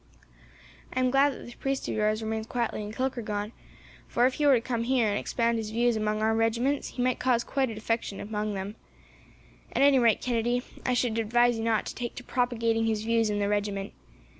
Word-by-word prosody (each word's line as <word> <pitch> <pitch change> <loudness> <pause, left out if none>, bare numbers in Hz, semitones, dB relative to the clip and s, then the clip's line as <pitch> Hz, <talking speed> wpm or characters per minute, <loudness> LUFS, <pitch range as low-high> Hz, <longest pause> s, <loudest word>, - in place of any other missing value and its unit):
"I - - -2
am 255 -1 +2
glad 275 +2 +4
that - - -10
this 240 - -10
priest 270 +1 -3
of - - -2
yours 215 +1 0
remains 220 0 -3
quietly 235 -3 -2
in 210 0 -5
Kilkargan, 220 -4 -2 0.6
for, 240 - +2
if 260 - +2
he 295 +1 +1
were 275 - +7
to - - +3
come 230 -1 -2
here, 250 -3 +2
and 205 - 0
expound 235 -1 0
his 215 -1 -4
views 235 +2 +2
among 215 0 -1
our 220 0 +3
regiments, 235 +5 +1
he 245 - +1
might 255 -1 +1
cause 245 -2 +2
quite 270 0 0
a 225 - -6
defection 220 -2 -2
among 210 0 -3
them. 195 +3 -5 1.0
At - - +3
any 280 -2 +6
rate, 230 -3 +4
Kennedy, 240 0 0 0.2
I 250 - +2
should 230 -2 +1
advise 240 +1 +3
you - - -2
not 225 -1 +1
to - - -5
take 240 -2 -5
to 250 - -8
propagating 230 -3 0
his 215 -1 0
views 225 -1 +2
in 205 - -1
the 205 -1 0
regiment. 205 -1 -2
230 Hz, 215 wpm, -28 LUFS, 215-245 Hz, 1.0 s, were